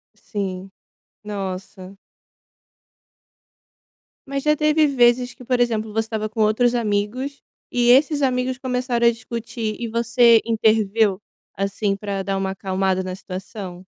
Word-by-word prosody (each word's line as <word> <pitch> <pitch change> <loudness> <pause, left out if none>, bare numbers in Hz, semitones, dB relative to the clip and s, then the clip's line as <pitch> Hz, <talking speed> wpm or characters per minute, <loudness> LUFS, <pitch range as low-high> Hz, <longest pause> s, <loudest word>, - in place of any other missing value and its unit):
Sim. 195 -2 -5 0.5
Nossa. 195 -1 -6 2.3
Mas 275 0 -3
já 300 0 +3
teve 305 0 +3
vezes 245 -2 +3
que, - - -14
por 250 0 0
exemplo, 220 -3 0
você 225 - -1
estava 220 -1 -3
com 220 +1 -3
outros 225 +3 +3
amigos, 235 +5 -2 0.3
e 240 -1 +2
esses 285 +3 +5
amigos 255 -1 0
começaram 250 -2 -1
a 235 - +6
discutir, 230 -1 -5
e 235 -1 -3
você 235 0 +4
interveio, 215 -2 +2 0.4
assim, 195 +1 -1
pra 200 -2 -3
dar 195 0 -1
uma 190 0 -1
acalmada 190 -1 -1
na 185 0 -5
situação? 185 -1 -8
220 Hz, 130 wpm, -22 LUFS, 195-245 Hz, 2.3 s, a